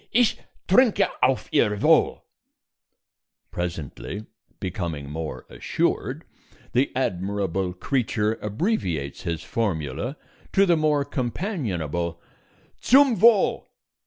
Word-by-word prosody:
ich 240 -1 +3 0.3
trinke 225 +4 +4
auf 130 0 +2
Ihr 105 -2 +2
Wohl!_" - - +4 1.3
Presently, 85 - -5 0.3
becoming 85 -7 -4
more 75 -5 -5
assured, - - -2 0.5
the 130 +3 +2
admirable 95 -5 -1
creature 110 -1 0
abbreviates 100 - -2
his 85 -2 -2
formula 100 - -2 0.4
to 195 0 +5
the 175 -3 +4
more 150 -2 +2
companionable 110 - -3 0.6
"_zum 270 -2 +5
Wohl! 230 -3 +4
105 Hz, 90 wpm, -24 LUFS, -, 1.3 s, to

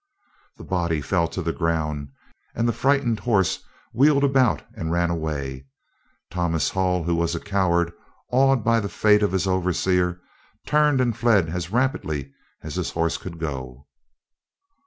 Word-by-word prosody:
The - - -11
body 85 -4 -1
fell 85 +4 0
to 90 +2 -5
the 85 0 -1
ground, 75 -4 -2 0.5
and 115 +1 +1
the 120 - +1
frightened 130 -5 +1
horse 100 -7 +1 0.3
wheeled 140 +3 +4
about 135 -4 +3
and 80 0 -4
ran 85 0 +1
away. 70 -5 -4 0.6
Thomas 85 -4 0
Hull, 90 -2 0
who 85 +1 0
was 85 0 0
a - - -2
coward, 85 -4 +1 0.4
awed 135 -1 +3
by 115 +1 +3
the 100 -2 -3
fate 105 0 +3
of 105 - +2
his 95 0 0
overseer, 90 -1 +1 0.5
turned 150 -3 +3
and 120 -3 +1
fled 110 -8 +3
as 85 +1 -4
rapidly 80 - -1 0.3
as - - -6
his - - -2
horse 85 0 -1
could 85 -2 -8
go. 65 -4 -6
90 Hz, 155 wpm, -23 LUFS, 80-115 Hz, 0.6 s, wheeled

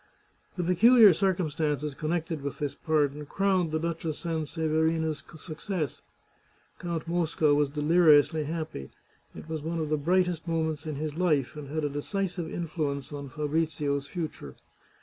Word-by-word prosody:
The 180 - 0
peculiar 210 +4 +7
circumstances 155 -5 0
connected 160 +1 -2
with 140 -1 -4
this 145 -2 -2
pardon 150 -1 0
crowned 190 -2 +1
the 155 - 0
Duchess 165 -1 -3
Sanseverina's 160 -1 0 0.2
success. 155 -2 -4 0.8
Count 170 -2 -4
Mosca 165 -3 +2
was 145 -1 +2
deliriously 155 0 +4
happy. 155 - -5 0.5
It - - -9
was 160 -2 -4
one 165 +2 -3
of 155 -2 -2
the 155 - +2
brightest 175 +2 +1
mo 165 -1 +1
ments 155 -1 -3
in 155 - -3
his 150 +1 -3
life, 150 -8 +1
and 150 -2 -7
had 155 +2 -3
a - - +2
decisive 175 +3 -3
influence 150 -4 -3
on 140 -1 -6
Fabrizio's 150 -1 -1
future. 150 - -6
155 Hz, 145 wpm, -28 LUFS, 150-170 Hz, 0.8 s, peculiar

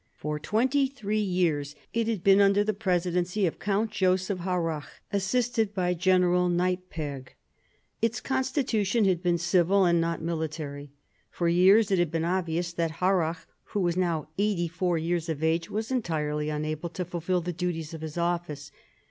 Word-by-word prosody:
For 150 0 -4
twenty 260 - +1
three 215 -6 -3
years 165 -7 0 0.2
it 230 -1 0
had 215 -6 -2
been 195 0 +6
under 200 +1 +4
the 215 +1 0
presidency 180 -1 0
of 165 - -2
Count 210 +2 0
Joseph 185 0 +1
Harrach, 170 -4 -2 0.3
assisted 220 +1 0
by 180 -2 +1
General 180 0 +3
Neiperg. 175 -6 -2 0.7
Its 230 0 +1
constitution 245 -6 0
had 185 -3 +2
been 175 -2 +2
civil 175 +3 +3
and 170 -1 +3
not 165 0 -1
military. 155 -3 -4 0.4
For 170 - -2
years 190 +5 +5
it 190 - +3
had 175 -2 +2
been 165 +1 -1
obvious 170 -1 -1
that 165 -2 -1
Harrach, 180 -3 +1 0.2
who 205 - -3
was 175 -2 +1
now 170 -5 0
eighty 200 -4 +1
four 175 +1 -1
years 170 +1 -1
of 160 -1 -3
age, 165 +1 +1
was 220 +3 -3
entirely 150 -10 -1
unable 155 +2 -3
to 180 +2 -4
fulfil 175 +1 -1
the 175 +1 -4
duties 170 -2 -3
of 160 - -7
his 160 0 -6
office. 170 -4 -2
180 Hz, 165 wpm, -27 LUFS, 165-195 Hz, 0.7 s, been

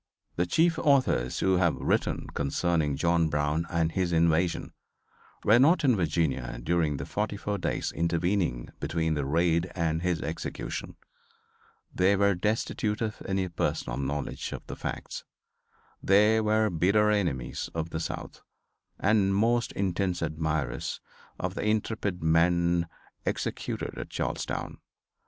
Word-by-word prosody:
The 90 +1 0
chief 165 - +3
authors 130 - +2
who 95 -1 +3
have 85 -3 +3
written - - 0
concerning 75 +1 0
John 85 +1 +2
Brown 75 +3 0
and 85 -1 +1
his 90 0 0
invasion 85 +1 +2 0.7
were 110 +3 +6
not 160 +6 +5
in 130 -4 +4
Virginia 75 - 0
during 80 +1 +1
the - - -5
forty 105 0 -2
four 100 0 -3
days - - -1
intervening 85 -5 0
between 80 +2 0
the 75 -3 -1
raid 85 +3 +2
and 80 -2 0
his 90 -2 0
execution. 80 - -5 1.0
They 95 +2 +3
were 100 0 +3
destitute 105 +2 -1
of 110 -2 -3
any 95 -1 0
personal 70 -7 -2
knowledge 70 +1 -3
of - - -7
the - - -6
facts. - - -5 0.8
They 105 +3 +4
were 110 0 +2
bitter 100 +6 +3
enemies 90 -11 -1
of 80 0 -3
the 80 - -2
South 80 - -5 0.6
and 100 -1 +3
most 115 +3 +2
intense 90 -2 -1
admirers 80 -3 -2 0.4
of - - -2
the - - -4
intrepid 105 -4 -1
man 85 +1 +3 0.4
executed - - -3
at - - -6
Charlestown. - - -3
85 Hz, 135 wpm, -28 LUFS, 80-100 Hz, 1.0 s, were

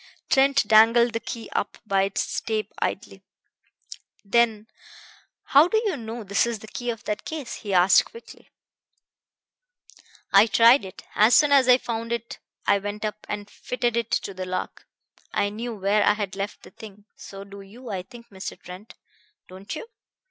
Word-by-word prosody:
Trent 275 -3 +3
dangled 230 +2 +5
the 230 - -1
key 230 0 -7 0.4
by 195 -2 +1
its 195 0 -2
tape 220 -1 -3
idly. - - -4 1.0
Then 220 0 +2 0.8
"How 290 +4 +5
do 440 - +1
you 395 -6 0
know 230 -2 -7
this 200 +3 +1
is 235 -1 -3
the 220 - -13
key 245 +3 -5
of 230 -2 -5
that 210 0 -4
case?" 300 -7 -6
he 205 - -7
asked 185 0 +5
quickly. 465 - -15 1.8
"I 200 +3 +7
tried 230 +1 +5
it. 185 - -11
As 215 +3 +5
soon 295 -1 +5
as 275 -2 +5
I 250 -1 +7
found 230 -2 -5
it 235 -1 -4 0.3
I 200 - +3
went 205 +2 -5
up 215 0 -6
and 205 -1 -4
fitted 240 +2 -3
it 235 -1 -1
to 195 - -2
the 185 0 -6
lock. 185 0 -5 0.5
I 205 - +1
knew 230 +3 -6
where 205 +1 +1
I 210 - +4
had 205 -3 -4
left 200 +1 -5
the - - -14
thing. 205 -2 -13
So 195 0 -10
do 200 0 -12
you, 225 +5 -11
I 190 -2 -3
think, 235 +4 -15
Mr. 190 -1 -8
Trent. 185 +4 -12 0.5
Don't 190 +8 -8
you?" 305 - -7
220 Hz, 170 wpm, -24 LUFS, 200-235 Hz, 1.8 s, I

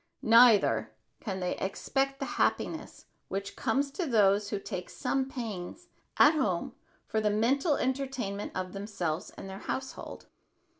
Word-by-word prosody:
Neither 230 -2 +6 0.3
can 190 -4 -4
they 180 - -1
expect 270 +8 -1
the 275 - -2 0.2
happiness - - -1 0.2
which 200 +1 -4
comes 275 +5 0
to 340 +4 -3
those 205 -4 +3
who 205 - -1
take 180 -2 -6
some 265 0 -1
pains 235 - -6 0.3
at 295 - +7
home 205 - 0 0.3
for 220 - -1
the 210 - +2
mental 270 - +2
entertainment 255 -7 -2
of 185 -1 -3
themselves 195 -5 -3
and - - -7
their 190 0 -7
household. 265 0 -5
220 Hz, 140 wpm, -30 LUFS, 195-270 Hz, 0.3 s, at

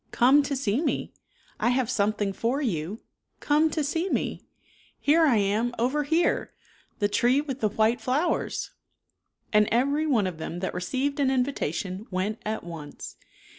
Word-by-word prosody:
Come 265 +5 +5
to 280 0 -2
see 250 -1 0
me. - - -2 0.5
I - - +2
have 250 -1 +1
something 205 -3 0
for 235 +8 -1
you. 195 - -2 0.4
Come 300 +2 +3
to 310 0 -1
see 330 +6 -1
me. - - -1 0.6
Here 320 +3 +4
I 255 - +4
am, 215 +4 +1
over 260 +6 +1
here, 325 +4 +1 0.5
the 205 - +2
tree 245 +6 +3
with 275 -3 -4
the 215 - +1
white 220 +3 +2
flpwers," 295 +7 -1 0.7
43 - - -46
And 210 0 +5
every 280 +7 +2
one 235 -9 +2
of 180 -4 -4
them 165 +2 -5
that 190 - -2
received 260 +11 -2
an 275 -2 +3
invitation 215 - -2
went 195 +4 -2
at 220 +1 -3
once. 160 -4 -8
240 Hz, 165 wpm, -26 LUFS, 205-280 Hz, 0.7 s, Come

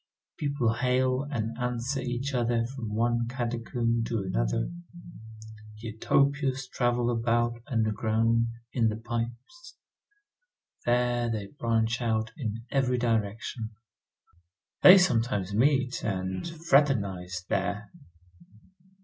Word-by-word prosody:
People 140 -6 +1
hail 130 +1 +1
and 115 -5 -2
answer 125 +2 -1
each 130 +2 -3
other 120 -2 +1
from 115 -4 -5
one 120 +1 +1
catacomb 120 -1 -1
to 115 -3 -2
another. - - -1 1.1
Utopias 135 +4 0
travel 120 -1 +1
about 120 0 0
underground, 115 0 +1 0.3
in 115 -3 +2
the 110 - 0
pipes. 120 - -6 1.1
There 120 0 +2
they 105 -3 -3
branch 115 0 +1
out 110 -1 0
in 115 -6 -4
every 130 -2 +2
direction. 110 -1 -2 1.1
They 185 +1 +10
sometimes 115 - +1
meet, 130 +2 +2
and 95 - -2
fraternize 115 - +1
there. 105 +2 -2
120 Hz, 100 wpm, -28 LUFS, 110-125 Hz, 1.1 s, They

